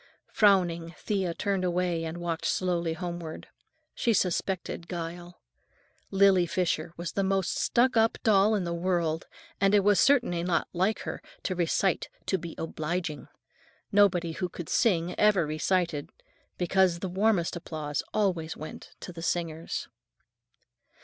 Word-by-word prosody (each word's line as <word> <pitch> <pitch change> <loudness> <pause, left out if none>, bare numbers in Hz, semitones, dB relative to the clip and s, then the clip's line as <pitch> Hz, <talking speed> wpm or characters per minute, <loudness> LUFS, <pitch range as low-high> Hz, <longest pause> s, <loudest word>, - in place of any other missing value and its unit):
Frowning, 175 -5 +3
Thea 190 -5 -1
turned 200 -2 -1
away 175 -2 0
and 160 +1 -5
walked 170 -2 -3
slowly 175 -3 0
homeward. 170 -2 -6 0.4
She 235 - +1
suspected 180 -2 -1
guile. 175 0 -6 0.7
Lily 195 -2 +4
Fisher 170 -2 -1
was 170 0 -4
the 195 - 0
most 190 -1 0
stuck 250 +2 +2
up 225 0 +3
doll 210 0 +4
in 200 - 0
the 170 -1 -2
world, 170 -2 -1 0.3
and 195 +1 +4
it 205 - +5
was 205 0 +4
certainly 245 -12 +3
not 175 0 0
like 190 +5 +1
her - - -5 0.2
to 185 - -1
recite 180 +1 0 0.2
to 190 - 0
be 165 0 -7
obliging. 165 0 -3 0.6
Nobody 180 -4 +4
who 180 +2 -3
could 170 -2 -8
sing 180 -6 +2
ever 205 -5 +4
recited, 155 0 0 0.5
because 180 0 +2
the 190 - -4
warmest 190 -1 +1
applause 155 -3 -4
always 175 -6 0
went 155 - -9
to 180 - -7
the 165 - -8
singers. 165 -1 -2
175 Hz, 140 wpm, -28 LUFS, 170-195 Hz, 0.7 s, it